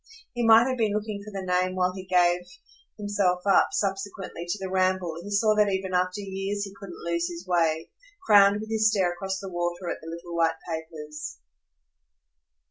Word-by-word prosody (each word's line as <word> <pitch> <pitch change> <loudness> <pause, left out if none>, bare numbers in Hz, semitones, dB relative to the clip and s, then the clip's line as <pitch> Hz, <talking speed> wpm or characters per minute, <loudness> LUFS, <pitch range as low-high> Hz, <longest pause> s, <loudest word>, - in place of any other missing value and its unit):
He 240 -1 -2
might 225 +2 +7
have 255 -1 -2
been 215 -2 +2
looking 210 -1 -3
for 210 - -9
the 195 -2 -5
name 185 0 +1
while 180 0 +1
he 190 0 -8
gave 180 -1 +3 0.6
himself 200 -4 0
up, 195 - +5
subsequently, 195 -3 -3
to 175 - -1
the 190 - -4
ramble 185 -2 +1
he 200 - -8
saw 215 +1 +3
that 210 -1 +4
even 190 -1 -2
after 180 +2 0
years 195 +1 -3
he 195 -1 -7
couldn't 185 -4 -9
lose 170 0 0
his 175 +1 -8
way 165 -3 +1 0.4
crowned 205 0 +6
with 220 0 -7
his 220 -1 +4
stare 190 -5 +1
across 190 +1 -4
the 195 - -7
water 175 0 -2
at - - -6
the 160 - -9
little 170 +1 -7
white 165 -1 +2
papers. 155 - -6
190 Hz, 190 wpm, -26 LUFS, 175-205 Hz, 0.6 s, might